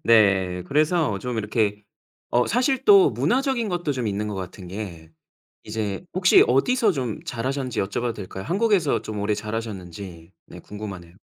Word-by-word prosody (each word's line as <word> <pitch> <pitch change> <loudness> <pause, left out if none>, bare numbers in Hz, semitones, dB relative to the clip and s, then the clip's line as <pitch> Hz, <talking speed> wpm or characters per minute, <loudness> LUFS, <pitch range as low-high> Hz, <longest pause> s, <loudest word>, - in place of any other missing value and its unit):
네. 95 -5 +4
그래서 150 - +1
좀 125 -1 -4
이렇게 105 -1 -1 0.5
어 120 +1 +3
사실 260 +2 +1
또 395 -2 +7
문화적인 255 -3 0
것도 175 -5 -1
좀 125 -4 -3
있는 105 +1 -2
것 105 - -4
같은 95 -1 -7
게 90 -5 -7 0.5
이제 105 - -3
혹시 185 0 +6
어디서 215 - +3
좀 125 -7 -4
자라셨는지 130 0 -2
여쭤봐도 115 +4 -2
될까요? 95 -1 -7
한국에서 195 - +1
좀 105 -2 -5
오래 105 +1 +1
자라셨는지 100 -5 -6
네 - - -11
궁금하네요. 100 -5 -8
110 Hz, 335 characters per minute, -24 LUFS, 100-155 Hz, 0.5 s, 또